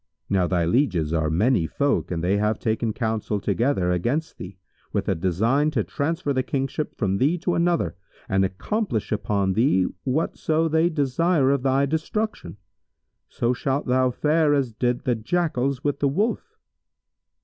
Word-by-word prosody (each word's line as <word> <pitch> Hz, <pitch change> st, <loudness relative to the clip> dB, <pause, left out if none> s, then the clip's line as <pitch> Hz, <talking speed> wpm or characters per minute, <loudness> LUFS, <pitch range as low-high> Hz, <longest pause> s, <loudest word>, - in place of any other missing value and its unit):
Now 95 Hz, -3 st, +2 dB
thy 85 Hz, -2 st, +1 dB
lieges 85 Hz, -, +1 dB
are 80 Hz, -1 st, +1 dB
many 95 Hz, +2 st, +2 dB
folk 140 Hz, -, 0 dB
and 85 Hz, -2 st, -3 dB
they 95 Hz, +3 st, +2 dB
have 105 Hz, +1 st, +1 dB
taken 110 Hz, 0 st, -1 dB
counsel 110 Hz, -2 st, -2 dB
together 100 Hz, -2 st, 0 dB
against 120 Hz, -, -1 dB
thee, 90 Hz, +1 st, -8 dB, 0.3 s
with -, -, -2 dB
a -, -, +2 dB
design 110 Hz, -, +1 dB
to 110 Hz, -, +2 dB
transfer 150 Hz, -, -2 dB
the 130 Hz, -, +1 dB
Kingship 135 Hz, +3 st, -3 dB
from 100 Hz, -3 st, 0 dB
thee 150 Hz, +7 st, +2 dB
to 180 Hz, +1 st, -1 dB
another 170 Hz, -, +1 dB, 0.3 s
and 95 Hz, -1 st, +2 dB
accomplish 110 Hz, -, -2 dB
upon 100 Hz, -2 st, 0 dB
thee 110 Hz, -4 st, +3 dB, 0.2 s
whatso 155 Hz, +3 st, 0 dB
they 160 Hz, +2 st, +2 dB
desire 145 Hz, 0 st, +2 dB
of 140 Hz, -2 st, +1 dB
thy 135 Hz, +1 st, +2 dB
destruction. 160 Hz, -, -3 dB, 0.7 s
So 120 Hz, +1 st, 0 dB
shalt 135 Hz, +3 st, -1 dB
thou 130 Hz, 0 st, +2 dB
fare 150 Hz, +3 st, +2 dB
as 130 Hz, -5 st, -1 dB
did 120 Hz, +2 st, 0 dB
the 125 Hz, -, +1 dB
Jackals 135 Hz, +1 st, -1 dB
with 145 Hz, -1 st, -1 dB
the 145 Hz, -, +2 dB
Wolf." 200 Hz, -, -1 dB
125 Hz, 160 wpm, -24 LUFS, 100-150 Hz, 0.7 s, thee